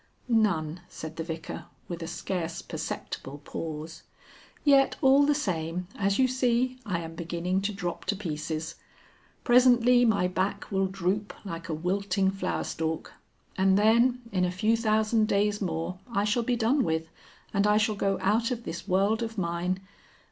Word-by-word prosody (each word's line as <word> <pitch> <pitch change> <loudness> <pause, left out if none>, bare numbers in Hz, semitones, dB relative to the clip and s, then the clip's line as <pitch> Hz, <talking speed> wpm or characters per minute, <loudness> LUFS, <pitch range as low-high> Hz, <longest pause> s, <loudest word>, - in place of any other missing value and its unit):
"None," 180 -8 +1
said 160 0 -8
the 165 - -2
Vicar 160 -1 -6 0.2
with 170 -1 -5
a 165 - -4
scarce 170 -3 -3
perceptible 140 +2 -5
pause. 160 0 -6 0.6
"Yet 275 -2 +5
all 275 +2 +5
the 295 - +3
same, 175 - -2
as 200 -1 +1
you 260 - +4
see, 255 0 +1
I 175 -4 -1
am 165 0 -7
beginning 170 +3 -2
to 200 +2 -1
drop 180 -4 -4
to 205 - 0
pieces. 160 -3 -4 0.7
Presently 245 0 +5
my 205 -6 +3
back 190 +3 -2
will 195 -1 +2
droop 195 +2 -2
like 170 -2 -6
a 160 - -1
wilting 190 +3 0
flowerstalk. 160 -4 -3 0.4
And 190 0 +4
then, 235 +4 +4
in 185 -2 +1
a 180 - +2
few 215 +5 +2
thousand 220 0 +2
days 205 +1 +1
more 170 0 -3
I 200 -3 +1
shall 215 +3 +1
be 245 +1 0
done 245 +4 +2
with, 160 -2 -1 0.5
and 200 0 +3
I 210 0 +4
shall 215 0 +2
go 195 -1 0
out 220 +4 +2
of 240 -2 -3
this 170 - -6
world 200 +5 +2
of 225 -1 -4
mine.... 180 +1 -1
195 Hz, 160 wpm, -28 LUFS, 170-225 Hz, 0.7 s, Yet